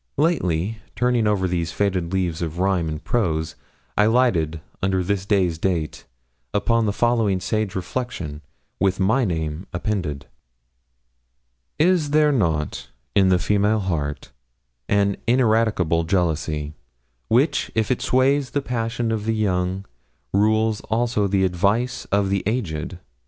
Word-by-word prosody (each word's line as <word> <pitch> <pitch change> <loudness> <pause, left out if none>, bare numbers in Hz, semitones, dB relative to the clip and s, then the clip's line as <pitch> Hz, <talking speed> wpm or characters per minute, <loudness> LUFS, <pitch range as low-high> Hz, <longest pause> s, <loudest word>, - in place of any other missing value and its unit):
Lately, 110 - +1 0.2
turning 125 -3 +2
over 100 -3 +1
these 85 -2 -1
faded 90 -2 -1
leaves 90 -4 -1
of 85 -1 -3
rhyme 90 -3 +1
and 75 -1 -5
prose, 80 -8 0 0.4
I 105 - +4
lighted, 95 -10 +2 0.2
under 95 -1 +1
this 95 +1 -2
day's 90 -6 +1
date, 85 -4 -2 0.5
upon 115 +2 +2
the - - +2
following 110 -3 +1
sage 110 0 -2
reflection, 90 - -4 0.4
with 95 0 +1
my 110 +7 +3
name 80 -1 -3
appended: 90 -6 -3 1.5
'Is 165 -1 +3
there 150 0 +4
not 80 - -1 0.2
in 95 -2 +4
the 90 - +4
female 105 +4 +2
heart 75 -7 -3 0.6
an 100 -1 +2
ineradicable 110 -9 +2
jealousy, 80 -4 -1 0.5
which, 130 +8 +2
if 110 +2 +1
it 125 - 0
sways 135 +1 +2
the 145 - -1
passions 115 -1 -1
of 105 -1 -3
the 115 0 0
young, 95 -2 0 0.5
rules 110 +2 +2
also 115 -2 +1
the 95 -1 +2
advice 100 +8 0
of 100 -1 +1
the 100 -1 +1
aged? 95 -7 -2
100 Hz, 130 wpm, -22 LUFS, 85-115 Hz, 1.5 s, I